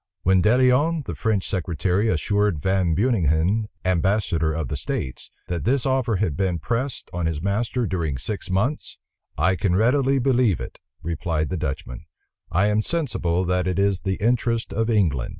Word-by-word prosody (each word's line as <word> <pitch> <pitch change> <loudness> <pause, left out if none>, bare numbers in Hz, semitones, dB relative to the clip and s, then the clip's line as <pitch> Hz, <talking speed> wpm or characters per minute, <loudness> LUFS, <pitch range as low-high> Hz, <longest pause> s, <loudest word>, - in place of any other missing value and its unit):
When 95 0 +4
De 110 +5 +4
Lionne, 140 +5 +3
the - - -4
French 110 -4 -1
secretary, 90 +3 0
assured 100 +1 +1
Van 90 +1 +1
Beuninghen, 100 - +1 0.2
ambassador 90 -3 +1
of 80 0 -3
the 75 - -3
states, 65 -2 -4 0.2
that 85 -1 -3
this 130 +2 +1
offer 130 -4 +1
had 90 -6 0
been 90 0 0
pressed 115 - -3
on 85 -1 -1
his 80 -2 -2
master 110 +6 -1
during 85 -8 -2
six 95 - -4
months, 105 +11 -1 0.4
"I 85 +5 +2
can 90 +1 0
readily 135 +6 +3
believe 125 - +2
it," - - -8 0.2
replied 80 -2 -2
the 95 - -2
Dutchman; 65 -4 -5 0.5
"I 95 +4 +3
am 105 +1 +2
sensible 105 - -1
that 90 +1 0
it 95 - -1
is 100 -1 +1
the 95 -1 -1
interest 115 +1 0
of 115 +2 0
England." 85 - +1
95 Hz, 170 wpm, -23 LUFS, 85-115 Hz, 0.5 s, When